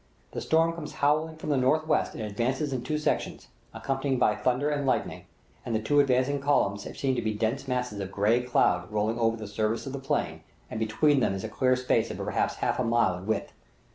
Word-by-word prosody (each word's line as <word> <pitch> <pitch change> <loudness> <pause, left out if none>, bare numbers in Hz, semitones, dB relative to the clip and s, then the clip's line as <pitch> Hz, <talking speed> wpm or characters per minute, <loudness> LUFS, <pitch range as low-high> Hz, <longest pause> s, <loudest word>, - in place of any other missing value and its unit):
The - - -5
storm 165 +1 +2
comes 165 -3 -7
howling 155 +3 +1
from 155 -1 -4
the 140 - +2
northwest 155 +5 +1
and - - -5
advances 130 +7 -1
in 130 - -2
two 150 +4 -2
sections, 150 - -2 0.2
accompanied 135 -1 -2
by - - +3
thunder 130 +4 0
and 145 -1 -1
lightning; 135 - -1 0.4
the 115 -2 -1
two 110 +7 +2
advancing 135 +1 +2
columns 100 -8 +1
seem 135 -1 0
to - - -1
be 110 -1 -2
dense 115 +6 -1
masses 125 -5 -2
of 95 -1 -5
gray 110 +5 +2
cloud 90 -7 +1
rolling 110 +2 0
over 115 0 +2
the 110 - -7
surface 110 +2 -1
of 135 - -6
the 140 - -4
plain, 135 - -2 0.3
and 110 - -4
between 135 +7 +2
them 95 - +1
is 95 - -5
a 110 - -4
clear 130 +3 +2
space 125 -3 +1
of - - -5
perhaps - - -1
half - - -1
a - - +2
mile 115 -5 +2
in 90 +3 -9
width. 110 -2 -2
125 Hz, 215 wpm, -27 LUFS, 110-140 Hz, 0.4 s, by